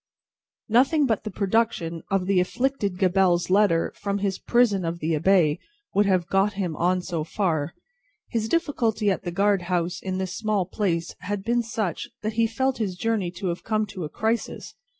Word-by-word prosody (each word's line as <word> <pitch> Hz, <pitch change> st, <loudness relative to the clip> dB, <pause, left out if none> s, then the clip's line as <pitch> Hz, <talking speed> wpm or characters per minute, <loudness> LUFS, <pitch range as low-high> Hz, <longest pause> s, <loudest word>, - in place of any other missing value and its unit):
Nothing 270 Hz, +7 st, +4 dB
but 225 Hz, -5 st, 0 dB
the -, -, -2 dB
production 195 Hz, -5 st, 0 dB
of 195 Hz, -2 st, +1 dB
the 195 Hz, -1 st, +3 dB
afflicted 205 Hz, 0 st, -1 dB
Gabelle's 185 Hz, -2 st, +2 dB
letter 195 Hz, -4 st, +3 dB
from 200 Hz, -1 st, -2 dB
his 195 Hz, -1 st, -1 dB
prison 235 Hz, -6 st, +2 dB
of 165 Hz, 0 st, -2 dB
the 160 Hz, 0 st, -1 dB
Abbaye 160 Hz, -1 st, +3 dB, 0.3 s
would 205 Hz, 0 st, +3 dB
have 185 Hz, -3 st, +2 dB
got 195 Hz, +4 st, +2 dB
him 185 Hz, -5 st, -2 dB
on 180 Hz, +3 st, +1 dB
so 170 Hz, -4 st, -2 dB
far. 160 Hz, -3 st, -1 dB, 0.5 s
His 225 Hz, -2 st, -2 dB
difficulty 230 Hz, -10 st, +1 dB
at 190 Hz, -, -2 dB
the 175 Hz, -, -2 dB
guard 200 Hz, +1 st, +2 dB
house 175 Hz, 0 st, -1 dB
in 185 Hz, -1 st, -3 dB
this 190 Hz, 0 st, -3 dB
small 215 Hz, -4 st, 0 dB
place 175 Hz, -3 st, -1 dB
had 200 Hz, 0 st, -4 dB
been 240 Hz, +2 st, +1 dB
such, 220 Hz, -7 st, -3 dB
that 215 Hz, +1 st, -1 dB
he 230 Hz, +1 st, +2 dB
felt 260 Hz, +3 st, -1 dB
his 195 Hz, -5 st, -1 dB
journey 215 Hz, -2 st, 0 dB
to 180 Hz, +1 st, -4 dB
have 170 Hz, -, -4 dB
come 215 Hz, -1 st, 0 dB
to 185 Hz, -, -5 dB
a 150 Hz, -, -4 dB
crisis. 225 Hz, +6 st, -2 dB
195 Hz, 185 wpm, -25 LUFS, 180-220 Hz, 0.5 s, Nothing